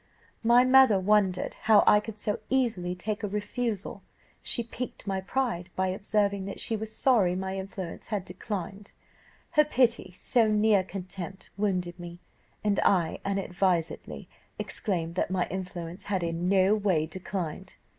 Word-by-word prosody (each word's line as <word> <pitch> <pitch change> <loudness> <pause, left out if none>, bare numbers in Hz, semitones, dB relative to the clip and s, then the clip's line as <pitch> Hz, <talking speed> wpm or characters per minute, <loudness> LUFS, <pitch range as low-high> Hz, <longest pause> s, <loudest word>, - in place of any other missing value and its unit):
"My 240 +2 +6
mother 255 -5 +6
wondered 190 -1 +2
how 215 -2 +7
I 210 - +7
could 215 0 -8
so 210 0 -2
easily 220 -9 0
take 205 +4 -3
a 210 - -1
refusal; 210 +1 -3 0.4
she 235 - +1
piqued 235 0 -7
my 195 -1 -1
pride 215 -5 -2
by 190 0 +1
observing 200 0 0
that 195 - -6
she 225 - -1
was 220 0 -5
sorry 220 -6 +3
my 190 +1 -3
influence 190 -2 -6
had 205 -4 -2
declined; 195 +1 -6 0.6
her 300 - +5
pity, 240 -9 +1
so 225 +5 +2
near 210 -2 +3
contempt, 190 0 -7
wounded 185 -4 -1
me, 175 0 -8 0.4
and 205 -2 +2
I 175 -5 +2
unadvisedly 185 -3 -1 0.3
exclaimed 170 -5 -3
that 180 - -1
my 185 -1 0
influence 180 -1 -6
had 190 -3 -1
in 170 +1 -1
no 195 +1 +4
way 195 -7 +1
declined. 175 -1 -5
195 Hz, 145 wpm, -28 LUFS, 180-215 Hz, 0.6 s, how